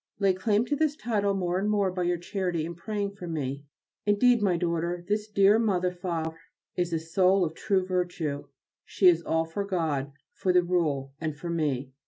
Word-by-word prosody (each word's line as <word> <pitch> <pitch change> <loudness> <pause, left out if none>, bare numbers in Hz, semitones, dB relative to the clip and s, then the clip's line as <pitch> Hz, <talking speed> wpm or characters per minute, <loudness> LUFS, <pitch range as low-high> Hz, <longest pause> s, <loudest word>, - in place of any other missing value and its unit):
Lay 195 -2 +3
claim 205 +4 +1
to 290 - 0
this 300 0 +1
title 205 -6 0
more 180 -1 0
and 205 +2 0
more 200 -3 +2
by 180 0 -3
your 175 0 +1
charity 175 -2 -2
in 170 - -5
praying 200 +3 -3
for 200 -3 -9
me. 140 -3 -3 0.4
Indeed, 230 +3 +4
my 185 -4 +2
daughter, 170 +1 -2
this 210 +1 0
dear 205 +1 +4
Mother 185 -5 +1
(Favre) 165 -3 -4 0.4
is 175 -1 -1
a 165 - +1
soul 185 +4 +2
of 155 - -4
true 190 +1 0
virtue. 175 -6 -2 0.4
She 190 - +2
is 170 -2 +6
all 160 -1 0
for 165 +5 -3
God, 160 -8 -1 0.2
for 185 - 0
the 180 0 +4
Rule, 150 -7 0
and 155 -2 -3
for 170 +3 -5
me. 140 -5 -1
180 Hz, 195 wpm, -27 LUFS, 165-200 Hz, 0.4 s, is